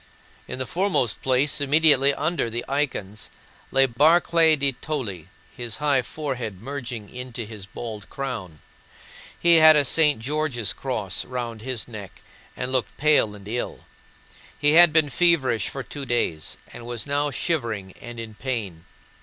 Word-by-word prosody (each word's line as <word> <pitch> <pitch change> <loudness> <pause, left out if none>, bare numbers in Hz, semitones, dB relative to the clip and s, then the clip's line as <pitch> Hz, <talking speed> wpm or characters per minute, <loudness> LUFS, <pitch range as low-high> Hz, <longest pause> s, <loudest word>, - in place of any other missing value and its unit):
In - - -5
the 130 - -2
foremost 175 - 0
place, 135 +3 +1
immediately 145 -1 +4
under 155 -2 -1
the 120 +1 -4
icons, 130 -8 -3 0.4
sat 135 -3 +3
Barclay 165 +2 +5
de 140 -1 +1
Tolly, 120 - -5 0.3
his 120 -2 -3
high 145 -3 +2
forehead 125 -6 -5
merging 120 -3 -6
into 125 -2 -6
his 105 -3 -10
bald 110 0 -8
crown. 110 - -6 0.8
He 170 -1 +5
had 155 -1 +8
a 145 -1 +4
St. 150 0 +4
George's 135 -3 -2
Cross 110 -9 -3
round 120 -3 -5
his 125 -1 -4
neck 105 -5 -10 0.3
and 125 - -3
looked 130 -2 -1
pale 145 -8 +3
and 100 -1 -13
ill. 120 +3 -4 0.7
He 145 0 +3
had 170 +1 +8
been 155 -2 +3
feverish 160 -10 +2
for 135 - -6
two 140 +3 -7
days 85 -10 -1 0.2
and 120 - -10
was 120 -2 -4
now 145 +1 0
shivering 115 - -2
and 120 -1 -8
in 115 -1 -7
pain. 105 -9 -5
130 Hz, 150 wpm, -24 LUFS, 115-145 Hz, 0.8 s, had